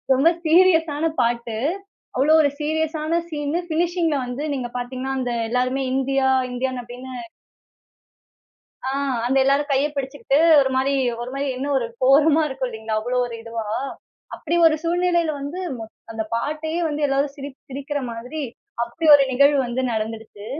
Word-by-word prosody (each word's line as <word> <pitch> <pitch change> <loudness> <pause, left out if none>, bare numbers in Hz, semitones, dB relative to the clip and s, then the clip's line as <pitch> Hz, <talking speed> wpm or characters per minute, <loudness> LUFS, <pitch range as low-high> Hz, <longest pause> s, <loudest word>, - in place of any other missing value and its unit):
ரொம்ப 280 +6 +5 0.2
சீரியஸான 325 -3 +4
பாட்டு. 235 -1 -1 0.6
அவ்வளவு 305 +5 +5
ஒரு 285 - +3
சீரியஸான 315 +1 -1
சீன் 295 -2 -3 0.2
பினிஷிங்‌ல 335 -1 +1
வந்து 250 +4 -5
நீங்க 255 -3 -3
பாத்தீங்கன்னா, 255 +2 -4
அந்த 250 -2 -2 0.2
எல்லாருமே 255 +2 0
இந்தியா, 270 0 +1 0.2
இந்தியன் 255 0 -2
அப்படின்னு 250 +2 -9 1.7
ஆ, - - 0 0.4
அந்த 265 +2 +1
எல்லாரும் 280 +2 +2
கைய 275 +2 +3
பிடிச்சுக்கிட்டு, 275 0 -1 0.2
ஒரு 265 - +1
மாரி 270 +2 +1 0.3
ஒரு 240 +1 -5
மாரி 280 +1 -2
இன்னும் 280 +2 -1
ஒரு 235 - -2 0.2
கோரமா 295 +4 +5
இருக்கும் 265 -1 -3
இல்லங்களா, 220 -1 -3
அவ்வளவு 245 +2 0
ஒரு 235 - -7
இதுவா! 230 -1 -5 0.7
அப்படி 335 +2 -3
ஒரு 310 - +5
சூழ்நிலையில 345 -1 +1
வந்து 285 +6 -5 0.2
மொத் 220 0 -9 0.2
அந்த 220 0 -2
பாட்டயே 310 +6 -2
வந்து 295 -1 -1
எல்லாரும், 275 +1 0
சிரி 280 +1 -6 0.2
சிரிக்குற 280 +2 -4
மாரி 250 +7 -5 0.4
அப்படி 315 +8 -4
ஒரு 285 - +7
நிகழ்வு 280 +3 +4
வந்து 240 +2 -2
நடந்துடுச்சு. 220 -1 -5
275 Hz, 145 wpm, -22 LUFS, 250-310 Hz, 1.7 s, ஒரு